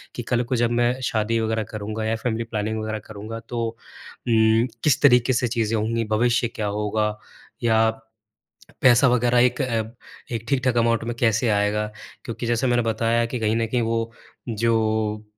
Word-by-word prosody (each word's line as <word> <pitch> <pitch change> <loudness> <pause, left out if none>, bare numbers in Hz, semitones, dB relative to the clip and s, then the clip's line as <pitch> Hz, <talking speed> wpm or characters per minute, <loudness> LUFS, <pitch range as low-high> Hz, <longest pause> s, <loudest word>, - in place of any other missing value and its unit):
कि 120 - -4
कल 120 +1 0
को 125 +2 -2
जब 120 0 +1
मैं 120 +2 +1
शादी 115 0 0
वग़ैरह 110 0 -1
करूँगा 110 +1 -4
या 110 +1 0
फैमिली 115 0 -2
प्लानिंग 110 -1 -3
वग़ैरह 110 0 -3
करूँगा 110 +2 -7
तो 120 -1 -2
उम, 115 0 0 0.2
किस 150 -5 +3
तरीके 125 -2 +5
से 125 +1 +1
चीज़ें 115 -1 0
होंगी? 115 +1 -1
भविष्य 120 +2 +1
क्या 105 -2 -2
होगा? 105 +1 -1 0.4
या 110 -1 +4 0.9
पैसा 130 +1 +6
वग़ैरह 120 0 +2
एक 125 +2 +2
अ, 115 -3 0 0.5
एक 115 -1 -3
ठीक-ठाक 130 -3 +1
अमाउंट 115 0 +2
में 120 0 -3
कैसे 115 +1 +2
आएगा? 105 +1 +1 0.4
क्योंकि 120 -1 -5
जैसे 120 +2 +1
मैंने 120 -1 +2
बताया 115 +1 +1
कि 125 +2 -4
कहीं 110 +1 +1
न 115 - +1
कहीं 120 +2 0
वो, 115 0 -1 0.4
जो, 110 -1 0
115 Hz, 170 wpm, -23 LUFS, 110-120 Hz, 0.9 s, पैसा